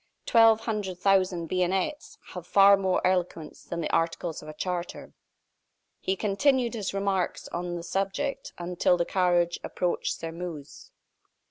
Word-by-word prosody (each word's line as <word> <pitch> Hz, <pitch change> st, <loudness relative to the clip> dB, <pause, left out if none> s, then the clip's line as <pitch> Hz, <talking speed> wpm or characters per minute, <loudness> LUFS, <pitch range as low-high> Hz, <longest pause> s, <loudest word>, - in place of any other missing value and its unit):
Twelve 225 Hz, -1 st, +5 dB
hundred 210 Hz, -5 st, -3 dB
thousand 185 Hz, -2 st, +2 dB
bayonets 185 Hz, -, -1 dB
have 180 Hz, -2 st, -8 dB
far 200 Hz, 0 st, +7 dB
more 190 Hz, -2 st, 0 dB
eloquence 180 Hz, -4 st, -1 dB
than 170 Hz, -1 st, -5 dB
the -, -, -3 dB
articles 165 Hz, 0 st, -1 dB
of 150 Hz, -, -12 dB
a -, -, -7 dB
charter." 180 Hz, +1 st, -4 dB, 0.9 s
He 190 Hz, -, -1 dB
continued 240 Hz, +5 st, +1 dB
his 210 Hz, -4 st, -3 dB
remarks 195 Hz, -2 st, -1 dB
on 175 Hz, 0 st, -4 dB
this 170 Hz, 0 st, -7 dB
subject 195 Hz, +9 st, -2 dB
until 180 Hz, 0 st, +1 dB
the 170 Hz, -, 0 dB
carriage 175 Hz, -2 st, +1 dB
approached 180 Hz, -1 st, -1 dB
Sairmeuse. 165 Hz, -3 st, -8 dB
185 Hz, 135 wpm, -27 LUFS, 175-195 Hz, 0.9 s, far